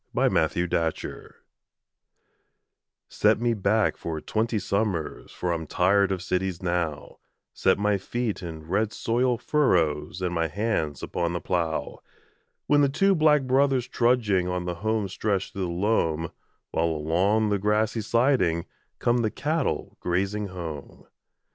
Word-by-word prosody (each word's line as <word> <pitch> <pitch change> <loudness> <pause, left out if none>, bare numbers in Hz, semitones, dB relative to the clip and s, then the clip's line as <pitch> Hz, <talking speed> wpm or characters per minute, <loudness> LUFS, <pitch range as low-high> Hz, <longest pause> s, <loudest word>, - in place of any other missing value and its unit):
THE - - +1
SHAKEDOWN 80 +2 +1
ON 90 - -3 0.2
THE - - -8
FLOOR - - -9 1.7
Set - - +2
me 120 0 +1
back 105 +1 +1
for 80 -2 -4
twenty 110 +7 -1
summers 100 -6 -2
For 90 - -2
I'm 80 -2 -3
tired 95 +3 +3
of 95 -1 -2
cities 95 -1 -2
now 85 -4 -2 0.3
Set 95 - +2
my 105 0 +1
feet 115 +1 -3
in 80 -3 -7
red 105 +5 0
soil 120 +1 +1
furrows 90 - +1
And 90 -1 -1
my 85 -1 +1
hands 80 -6 -2
upon 85 -1 -2
the 85 - -2
plough, 80 -5 -2 0.7
With 145 0 +4
the 140 - +4
two 195 +8 +3
'Black 155 -4 +4
Brothers' 130 -1 +2
trudging 115 -7 +2
On 90 -1 -2
the 90 - -2
home 110 -1 0
stretch 100 0 -2
through 95 -1 -2
the - - -2
loam 85 -3 0 0.4
While, 80 - +1
along 90 +8 +1
the 100 -1 +1
grassy 105 +2 +1
siding, 115 -8 +2 0.3
Come 120 +1 +2
the 110 -2 +1
cattle 155 +8 -2
grazing 100 +4 -1
home. 85 -6 -8
100 Hz, 150 wpm, -26 LUFS, 85-115 Hz, 1.7 s, With